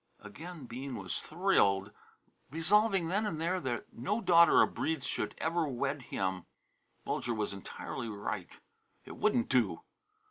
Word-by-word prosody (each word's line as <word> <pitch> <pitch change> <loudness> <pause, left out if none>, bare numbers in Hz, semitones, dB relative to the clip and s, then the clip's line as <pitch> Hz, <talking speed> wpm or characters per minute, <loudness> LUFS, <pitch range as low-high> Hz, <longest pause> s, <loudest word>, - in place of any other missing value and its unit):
Again 155 - -9
Bean 130 +2 -6
was 95 -4 -3
thrilled, 105 - +2 0.6
resolving 190 - +3
then 205 +4 +1
and 160 -6 -3
there 175 +3 0
that 125 -7 -4
no 200 - -1
daughter 170 -6 +7
of - - -1
Breede's 160 -4 -1
should - - -2
ever 165 0 0
wed 135 +2 -2
him. 95 -6 -3 0.6
Bulger 120 -1 -1
was 105 -2 -2
entirely 100 +4 -6
right. 100 -4 -4 0.6
It - - -9
wouldn't 235 +4 +2
do. - - +2
145 Hz, 140 wpm, -32 LUFS, 110-175 Hz, 0.6 s, daughter